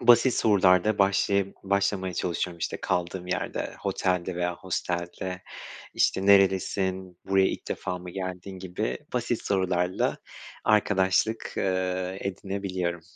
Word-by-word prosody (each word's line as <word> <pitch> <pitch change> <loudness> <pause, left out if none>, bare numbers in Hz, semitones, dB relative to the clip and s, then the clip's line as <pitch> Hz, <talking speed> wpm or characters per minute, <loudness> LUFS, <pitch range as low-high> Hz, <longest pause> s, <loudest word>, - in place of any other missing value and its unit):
basit 120 +1 +6
sorularla 100 -1 +4
başlayıp 100 0 +2
başlamaya 100 -2 0
çalışıyorum 85 0 -2
işte - - -2
kaldığım 90 +1 -2
yerde, 90 0 -3
hotelde 90 -1 -1
veya 90 0 0
hostelde, 90 0 -3 0.5
işte 95 - +2
nerelisin, 95 -2 +3
buraya 95 0 +4
ilk - - -6
defa 90 - -3
mı 90 0 -8
geldin 95 0 -5
gibi 95 +3 -3
basit 120 -1 -1
sorularla 90 -2 0 0.5
arkadaşlık, 105 +1 +2
eee, 95 0 -1
edinebiliyorum. 95 -3 -3
95 Hz, 110 wpm, -27 LUFS, 90-100 Hz, 0.5 s, basit